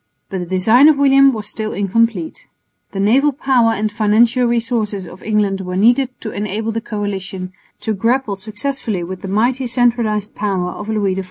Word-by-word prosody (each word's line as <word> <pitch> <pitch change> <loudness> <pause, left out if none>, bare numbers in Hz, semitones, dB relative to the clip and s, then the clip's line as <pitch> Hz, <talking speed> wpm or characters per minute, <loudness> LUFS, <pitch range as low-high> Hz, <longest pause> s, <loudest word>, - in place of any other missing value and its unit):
But 190 - -3
the 180 - -4
design 220 - +5
of 310 -2 +5
William 275 -1 +5
was 215 -4 -5
still 215 -1 -3
incomplete. 230 - -1 0.4
The 195 - -5
naval 255 +9 +3
power 255 -4 +2
and 215 -1 -2
financial 230 +3 +2
resources 225 -5 -1
of 180 +3 -12
England 205 -3 0
were 180 -1 -5
needed 240 +6 +3
to 215 - -5
enable 210 +2 -3
the 225 +1 -3
coalition 195 -4 -5 0.3
to 220 - -1
grapple 230 +1 0
successfully 215 0 -4
with 185 +1 -7
the 195 - -6
mighty 240 +6 0
centralised 230 -4 0
power 190 -4 -2
of 210 +3 -8
Louis 205 -3 0
XIV. 190 - -3
215 Hz, 175 wpm, -17 LUFS, 195-240 Hz, 0.4 s, design